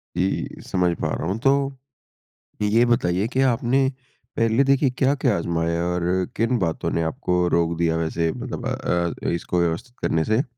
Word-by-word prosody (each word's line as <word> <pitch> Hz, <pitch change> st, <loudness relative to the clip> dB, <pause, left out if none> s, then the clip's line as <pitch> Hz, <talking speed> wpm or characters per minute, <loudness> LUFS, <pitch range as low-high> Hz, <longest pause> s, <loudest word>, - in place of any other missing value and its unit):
जी, 95 Hz, +1 st, -2 dB
समझ 90 Hz, -2 st, +1 dB
पा -, -, 0 dB
रहा 80 Hz, -, -3 dB
हूँ। 95 Hz, +4 st, -1 dB
तो, 135 Hz, +1 st, +1 dB, 0.9 s
ये 110 Hz, +3 st, +4 dB
बताइए 95 Hz, -4 st, +1 dB
कि 130 Hz, +1 st, -1 dB
आपने, 125 Hz, +3 st, +2 dB, 0.5 s
पहले 115 Hz, +4 st, +3 dB
देखिए, 135 Hz, 0 st, +3 dB
क्या-क्या 130 Hz, -2 st, +1 dB
आज़माया 85 Hz, 0 st, -1 dB
और 90 Hz, 0 st, -1 dB, 0.3 s
किन 115 Hz, +1 st, +1 dB
बातों 85 Hz, -4 st, -1 dB
ने 85 Hz, -, 0 dB
आपको 90 Hz, +2 st, 0 dB
रोक 85 Hz, 0 st, 0 dB
दिया 80 Hz, -1 st, +1 dB
वैसे 80 Hz, 0 st, 0 dB
मतलब -, -, -6 dB
अ, 85 Hz, -1 st, -1 dB
इसको 85 Hz, +1 st, -1 dB
व्यवस्थित 85 Hz, +9 st, -2 dB
करने 80 Hz, -1 st, +1 dB
से? 110 Hz, +5 st, +2 dB
95 Hz, 160 wpm, -23 LUFS, 85-125 Hz, 0.9 s, ये